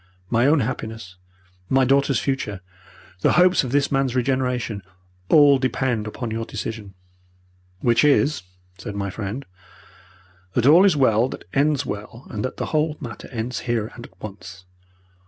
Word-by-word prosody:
My 120 Hz, +3 st, +3 dB
own 150 Hz, 0 st, +4 dB
happiness, 110 Hz, -6 st, -5 dB, 0.5 s
my 135 Hz, 0 st, +4 dB
daughter's 140 Hz, +1 st, +3 dB
future, 110 Hz, -8 st, -3 dB, 0.6 s
the -, -, +3 dB
hopes 180 Hz, -1 st, +5 dB
of 125 Hz, -, -4 dB
this 140 Hz, +1 st, +1 dB
man's 135 Hz, -2 st, +1 dB
regeneration, 125 Hz, -4 st, -1 dB, 0.5 s
all 145 Hz, -3 st, +6 dB
depend 130 Hz, -4 st, -1 dB
upon 115 Hz, +1 st, -5 dB
your 115 Hz, +1 st, -2 dB
decision. 110 Hz, -3 st, -6 dB, 0.9 s
"Which 120 Hz, -1 st, +3 dB
is," 150 Hz, 0 st, +3 dB, 0.4 s
said 100 Hz, +3 st, -6 dB
my 100 Hz, -1 st, -3 dB
friend, 110 Hz, +7 st, -5 dB, 1.1 s
"that 120 Hz, -, +2 dB
all 165 Hz, +7 st, +7 dB
is 190 Hz, -7 st, +4 dB
well 120 Hz, -2 st, +3 dB
that -, -, -9 dB
ends 145 Hz, 0 st, +2 dB
well 105 Hz, +4 st, -7 dB
and 105 Hz, -, -4 dB
that 130 Hz, -, -4 dB
the -, -, -2 dB
whole 155 Hz, 0 st, +1 dB
matter 115 Hz, -7 st, -8 dB
ends 120 Hz, +1 st, -4 dB
here 115 Hz, -2 st, -1 dB
and 120 Hz, -, -10 dB
at 95 Hz, -, -29 dB
once. 95 Hz, -3 st, -10 dB
125 Hz, 155 wpm, -22 LUFS, 110-140 Hz, 1.1 s, all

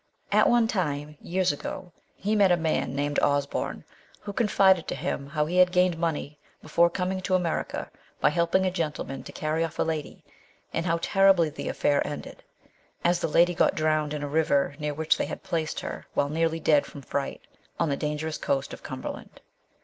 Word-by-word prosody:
At -, -, +5 dB
one 240 Hz, -2 st, +4 dB
time 150 Hz, -7 st, -2 dB
years 185 Hz, -1 st, +1 dB
ago 175 Hz, +5 st, -6 dB, 0.2 s
he 210 Hz, +3 st, -1 dB
met 200 Hz, -3 st, +5 dB
a 175 Hz, -, +4 dB
man 160 Hz, -5 st, -1 dB
named 145 Hz, +1 st, 0 dB
Osborne, 145 Hz, 0 st, 0 dB, 0.4 s
who 205 Hz, -, -6 dB
confided 190 Hz, -5 st, +3 dB
to -, -, -2 dB
200 -, -, -8 dB
MRS. -, -, +1 dB
SHELLEY. 140 Hz, -, -4 dB
him -, -, -13 dB
how 150 Hz, 0 st, 0 dB
he 175 Hz, +4 st, -2 dB
had 180 Hz, 0 st, +6 dB
gained 180 Hz, -2 st, +3 dB
money 150 Hz, -3 st, -2 dB, 0.2 s
before 170 Hz, +2 st, +3 dB
coming 185 Hz, +2 st, -2 dB
to 185 Hz, 0 st, +1 dB
America 175 Hz, -3 st, -2 dB, 0.3 s
by 150 Hz, -, +4 dB
helping 170 Hz, +4 st, +2 dB
a 185 Hz, -, +1 dB
gentleman 150 Hz, -6 st, -3 dB
to -, -, -10 dB
carry 155 Hz, +2 st, -1 dB
off 165 Hz, 0 st, -4 dB
a -, -, +2 dB
lady, 160 Hz, -3 st, -4 dB, 0.5 s
and 165 Hz, +2 st, -1 dB
how 165 Hz, 0 st, +2 dB
terribly 195 Hz, -5 st, +4 dB
the -, -, -5 dB
affair 145 Hz, -1 st, +1 dB
ended, 145 Hz, -, -7 dB, 0.6 s
as 175 Hz, 0 st, +3 dB
the -, -, 0 dB
lady 170 Hz, +3 st, +4 dB
got -, -, +2 dB
drowned 155 Hz, -1 st, +1 dB
in 145 Hz, -, -4 dB
a -, -, -2 dB
river 145 Hz, -2 st, +2 dB
near 150 Hz, -1 st, -2 dB
which 160 Hz, +1 st, +1 dB
they -, -, 0 dB
had -, -, -7 dB
placed 160 Hz, -2 st, -2 dB
her -, -, -6 dB
while 145 Hz, -, +2 dB
nearly 165 Hz, +1 st, 0 dB
dead 150 Hz, -2 st, +3 dB
from 140 Hz, -, -10 dB
fright, 140 Hz, +1 st, -3 dB, 0.4 s
on 165 Hz, -, +2 dB
the 140 Hz, -, +1 dB
dangerous 150 Hz, +2 st, -3 dB
coast 135 Hz, 0 st, -1 dB
of -, -, -9 dB
Cumberland. -, -, -7 dB
160 Hz, 205 wpm, -27 LUFS, 150-180 Hz, 0.6 s, had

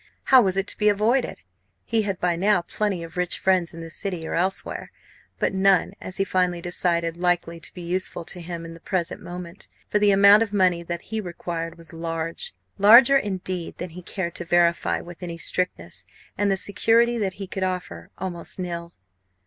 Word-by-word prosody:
How 260 Hz, -1 st, +7 dB
was 190 Hz, -3 st, +1 dB
it 195 Hz, -, +1 dB
to -, -, -4 dB
be 210 Hz, -1 st, +4 dB
avoided? 225 Hz, +5 st, +1 dB, 0.5 s
He 225 Hz, -, +1 dB
had 195 Hz, -3 st, -2 dB
by 180 Hz, -1 st, +1 dB
now 190 Hz, +1 st, +2 dB
plenty 195 Hz, -2 st, -2 dB
of 165 Hz, +1 st, -10 dB
rich 180 Hz, 0 st, 0 dB
friends 185 Hz, -3 st, +2 dB
in 165 Hz, -, -9 dB
the 165 Hz, 0 st, -8 dB
City 170 Hz, 0 st, -3 dB
or -, -, -4 dB
elsewhere, 185 Hz, +3 st, -2 dB, 0.5 s
but -, -, 0 dB
none, 190 Hz, -2 st, +3 dB
as 185 Hz, -, -5 dB
he 195 Hz, -, +2 dB
finally 180 Hz, -2 st, 0 dB
decided, 170 Hz, -1 st, -1 dB
likely 175 Hz, -1 st, 0 dB
to -, -, -11 dB
be 180 Hz, -, -7 dB
useful 175 Hz, -1 st, -2 dB
to 180 Hz, +1 st, -8 dB
him 170 Hz, -1 st, -6 dB
at 165 Hz, -, -8 dB
the 165 Hz, -, -12 dB
present 180 Hz, -1 st, -2 dB
moment. 175 Hz, +1 st, -9 dB, 0.2 s
For 210 Hz, -, +2 dB
the 205 Hz, 0 st, +4 dB
amount 200 Hz, +2 st, +7 dB
of 225 Hz, -3 st, 0 dB
money 185 Hz, -4 st, +3 dB
that 170 Hz, 0 st, -5 dB
he 220 Hz, -, 0 dB
required 170 Hz, -2 st, -5 dB
was 165 Hz, 0 st, -11 dB
large 165 Hz, -, -4 dB, 0.2 s
larger, 235 Hz, +7 st, +8 dB
indeed, 185 Hz, -6 st, -3 dB
than 180 Hz, -1 st, -6 dB
he 180 Hz, +2 st, -9 dB
cared 175 Hz, -1 st, -4 dB
to -, -, -4 dB
verify 170 Hz, 0 st, +2 dB
with 175 Hz, +1 st, -12 dB
any 170 Hz, -2 st, -5 dB
strictness, 160 Hz, -, -2 dB, 0.3 s
and 205 Hz, 0 st, +1 dB
the 195 Hz, -, +2 dB
security 230 Hz, +5 st, +2 dB
that 195 Hz, -3 st, -1 dB
he 195 Hz, +1 st, -6 dB
could 190 Hz, 0 st, -6 dB
offer, 185 Hz, -1 st, -4 dB
almost 180 Hz, -2 st, -5 dB
nil. 170 Hz, -2 st, -5 dB
180 Hz, 195 wpm, -24 LUFS, 170-195 Hz, 0.5 s, larger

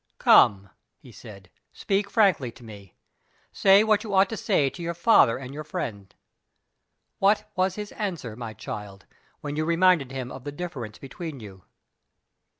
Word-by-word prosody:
"Come!" 100 Hz, -1 st, +4 dB, 0.3 s
he 130 Hz, -5 st, -16 dB
said; 100 Hz, -5 st, -13 dB, 0.2 s
"speak 200 Hz, 0 st, -2 dB
frankly 190 Hz, -, +2 dB
to 125 Hz, -, -16 dB
me. 100 Hz, -5 st, -13 dB, 0.6 s
Say 195 Hz, +1 st, +5 dB
what 215 Hz, -1 st, +2 dB
you 205 Hz, -3 st, -3 dB
ought 190 Hz, 0 st, +4 dB
to 225 Hz, -, -4 dB
say 170 Hz, -10 st, +1 dB
to 175 Hz, -, -7 dB
your 170 Hz, 0 st, -4 dB
father 170 Hz, -, +4 dB
and 135 Hz, 0 st, -9 dB
your 155 Hz, +1 st, -6 dB
friend. 100 Hz, -9 st, -6 dB, 1.1 s
What 210 Hz, +2 st, +2 dB
was 185 Hz, 0 st, 0 dB
his 210 Hz, -1 st, -7 dB
answer, 170 Hz, -, -5 dB
my 115 Hz, -2 st, -8 dB
child, 100 Hz, -2 st, -8 dB, 0.4 s
when 145 Hz, 0 st, -5 dB
you 155 Hz, -, -1 dB
reminded 170 Hz, -4 st, +2 dB
him 130 Hz, -2 st, -6 dB
of 130 Hz, -1 st, -9 dB
the 145 Hz, -, -6 dB
difference 140 Hz, -9 st, -7 dB
between 140 Hz, +2 st, -8 dB
you?" 95 Hz, -4 st, -13 dB
145 Hz, 160 wpm, -25 LUFS, 115-190 Hz, 1.1 s, Say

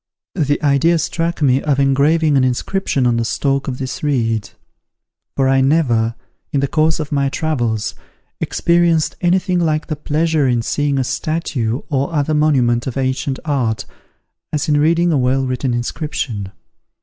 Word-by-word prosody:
The 145 Hz, -5 st, 0 dB
idea 150 Hz, +4 st, +3 dB
struck 165 Hz, 0 st, -2 dB
me 135 Hz, -1 st, +3 dB
of 140 Hz, -3 st, 0 dB
engraving 145 Hz, +3 st, +3 dB
an 135 Hz, -, +4 dB
inscription 130 Hz, +2 st, 0 dB
on 120 Hz, -1 st, +2 dB
the 115 Hz, -, 0 dB
stalk 135 Hz, +3 st, -1 dB
of 130 Hz, -2 st, -3 dB
this 130 Hz, -1 st, -5 dB
reed; 115 Hz, -7 st, 0 dB, 0.9 s
for 135 Hz, -1 st, +2 dB
I 135 Hz, 0 st, +3 dB
never, 125 Hz, -6 st, +2 dB, 0.4 s
in 145 Hz, -, +1 dB
the 140 Hz, -, +1 dB
course 155 Hz, +2 st, +1 dB
of 150 Hz, -2 st, -4 dB
my 140 Hz, -1 st, +1 dB
travels, 120 Hz, -9 st, -1 dB, 0.5 s
experienced 170 Hz, -2 st, +1 dB
any 175 Hz, +1 st, +3 dB
thing 185 Hz, -1 st, -1 dB
like 155 Hz, -2 st, 0 dB
the 155 Hz, -, -3 dB
pleasure 155 Hz, 0 st, 0 dB
in 120 Hz, -2 st, +1 dB
seeing 145 Hz, +2 st, 0 dB
a 135 Hz, -, +1 dB
statue 130 Hz, -5 st, -2 dB
or 140 Hz, -1 st, -1 dB
other 150 Hz, +1 st, +1 dB
monument 130 Hz, -6 st, +2 dB
of 130 Hz, -, -4 dB
ancient 130 Hz, 0 st, -1 dB
art, 125 Hz, -7 st, -1 dB, 0.7 s
as 150 Hz, -2 st, -1 dB
in 150 Hz, -1 st, +3 dB
reading 170 Hz, +3 st, +3 dB
a 150 Hz, -, +2 dB
well 130 Hz, +1 st, +1 dB
written 130 Hz, 0 st, -1 dB
inscription. 120 Hz, -5 st, -3 dB
140 Hz, 160 wpm, -18 LUFS, 130-155 Hz, 0.9 s, an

